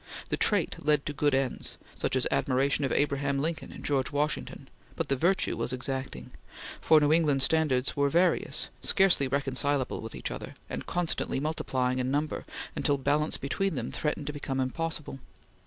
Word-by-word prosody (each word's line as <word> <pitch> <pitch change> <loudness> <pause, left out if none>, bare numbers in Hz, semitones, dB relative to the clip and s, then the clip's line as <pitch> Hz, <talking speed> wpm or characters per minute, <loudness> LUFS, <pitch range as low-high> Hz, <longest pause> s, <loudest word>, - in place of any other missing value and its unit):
The - - +1
trait - - +1
led 150 -1 +2
to 145 - -2
good 145 -1 +2
ends 135 -1 -2 0.2
such - - -1
as - - +3
admiration 135 +3 +1
of 135 - 0
Abraham 140 -1 +1
Lincoln 160 +3 -2
and - - -10
George 135 -1 +1
Washington 150 +1 -2 0.3
but - - -3
the 135 - +3
virtue 175 +8 +1
was - - -2
exacting; 130 - -4 0.5
for 160 -1 +6
New 150 0 +3
England 150 -5 +3
standards 140 -5 +2
were 140 0 +2
various, 175 +5 +2
scarcely 190 -8 +4
reconcilable 135 0 0
with 115 - -7
each - - -3
other, - - -7 0.2
and - - -5
constantly 175 -6 -1
multiplying 130 -4 -1
in 130 0 0
number, 150 +3 -1 0.3
until 145 -2 +1
balance 150 +3 +1
between 195 +8 -1
them - - -3
threatened 150 -1 -2
to 150 - -3
become 140 -2 -3
impossible. 145 +1 -3
140 Hz, 170 wpm, -29 LUFS, 135-155 Hz, 0.5 s, for